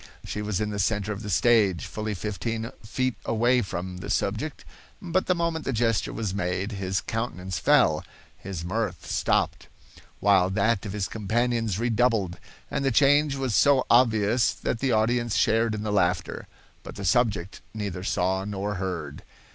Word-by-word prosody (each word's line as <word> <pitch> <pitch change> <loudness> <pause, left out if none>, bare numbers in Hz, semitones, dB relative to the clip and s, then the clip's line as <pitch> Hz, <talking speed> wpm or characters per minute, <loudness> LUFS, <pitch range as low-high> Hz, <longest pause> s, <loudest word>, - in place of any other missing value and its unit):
She 105 - -4
was 105 -3 -2
in 105 0 -1
the 100 - -4
center 105 +1 0
of 105 0 -5
the 105 - -6
stage, 100 -5 +3
fully 110 0 -4
fifteen 110 +4 -3
feet 130 +4 -1
away 120 +2 +2
from 90 -2 -5
the 90 - -7
subject, 110 +10 -2 0.3
but 185 +1 -1
the 185 - +3
moment 170 -2 -1
the - - -2
gesture 115 -3 +1
was 105 -5 -3
made, 95 +1 -2
his 95 -2 -2
countenance 95 -6 -3
fell, 75 0 +4 0.3
his 95 -3 -6
mirth 110 +5 -2
stopped, - - 0 0.5
while 95 -2 +4
that 105 +2 +1
of 100 - -5
his 100 -2 -2
companions 115 -1 -1
redoubled, 115 -5 +1 0.3
and 140 - -1
the 135 - +3
change 145 +2 +4
was 135 -4 -2
so 140 0 +4
obvious 115 -1 +4
that 115 - -3
the 135 0 +1
audience 120 +1 +1
shared 115 0 +2
in 105 - -4
the 105 -1 -2
laughter—but 90 -3 -3
the 100 - -6
subject 100 -2 +1
neither 100 -4 -4
saw 95 0 0
nor 100 0 -3
heard. 85 -6 -4
105 Hz, 165 wpm, -26 LUFS, 95-120 Hz, 0.5 s, fell